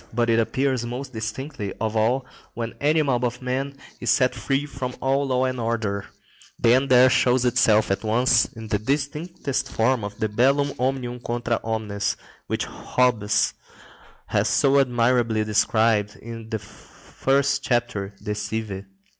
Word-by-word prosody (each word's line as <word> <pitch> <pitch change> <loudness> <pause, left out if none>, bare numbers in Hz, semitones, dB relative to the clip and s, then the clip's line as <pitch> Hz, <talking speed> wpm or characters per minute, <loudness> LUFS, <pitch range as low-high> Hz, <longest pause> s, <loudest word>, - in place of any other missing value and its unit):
But 115 0 +1
it 115 - +3
appears 130 +2 0
most 125 +3 -6
distinctly 110 -1 -5
of 110 0 -2
all 120 +4 +1 0.3
when 115 -1 -4
any 155 +2 +3
mob 125 -4 0
of 125 0 -1
men 135 +2 -3 0.2
is 120 - -2
set 125 +2 +3
free 135 +1 -1
from 130 -3 -5
all 135 +1 +1
law 130 0 +1
and 130 -1 -2
order; 110 -3 -2 0.5
then 125 +4 +4
there 130 -1 +7
shows 130 -1 +3
itself 110 -4 +3
at 95 - -1
once 115 +4 +3
in 110 -1 -10
the 105 - +1
distinctest 145 +4 -2
form 115 0 +1
the 110 - 0
bellum 135 +6 +2
omnium 125 -1 -1
contra 120 -1 -2
omnes, 110 -2 -2 0.3
which - - -1
Hobbes 120 -5 +1 0.7
has - - +1
so 140 0 +4
admirably 120 -3 +2
described 105 0 +2
in 115 -1 -9
the 110 - -1
first 135 +6 -2
chapter 120 -6 -1
De 105 0 -2
Cive. 105 -1 -4
120 Hz, 145 wpm, -24 LUFS, 110-130 Hz, 0.7 s, there